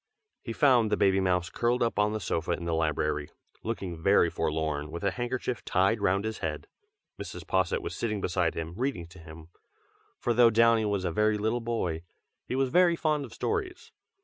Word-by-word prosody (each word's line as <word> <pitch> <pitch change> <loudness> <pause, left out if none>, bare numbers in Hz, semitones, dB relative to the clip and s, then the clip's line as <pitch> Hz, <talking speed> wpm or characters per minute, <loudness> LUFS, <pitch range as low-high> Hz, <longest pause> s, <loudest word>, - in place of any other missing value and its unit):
He 115 - -6
found 120 -3 +4
the - - +2
baby 95 -1 +3
mouse 90 -2 0
curled 120 +1 +1
up 115 - -1
on 105 0 +3
the 110 - -2
sofa 85 -3 -1
in 85 - -5
the 85 - -1
library, 75 -2 -1 0.3
looking 95 -7 -4
very 95 -2 +4
forlorn, 75 -2 -2
with 85 +3 -7
a 100 - +2
handkerchief 120 0 -3
tied 95 +4 +1
round 100 +2 +1
his 110 0 -4
head. - - -4 0.6
Mrs. - - -7
Posset 480 -4 0
was 415 - -5
sitting 110 -3 -2
beside 90 -3 0
him, 80 0 -4
reading 125 -7 -2
to 90 +1 -14
him, 80 0 -12 0.7
for 120 - 0
though 120 0 +6
Downy 115 0 +4
was 100 -2 -1
a 90 - 0
very 105 +4 +2
little 110 +3 -1
boy, 110 -9 -2 0.5
he - - -2
was 135 0 +1
very 175 +2 +4
fond 150 -3 0
of 120 - -13
stories. 380 -5 -3
105 Hz, 195 wpm, -28 LUFS, 85-120 Hz, 0.7 s, though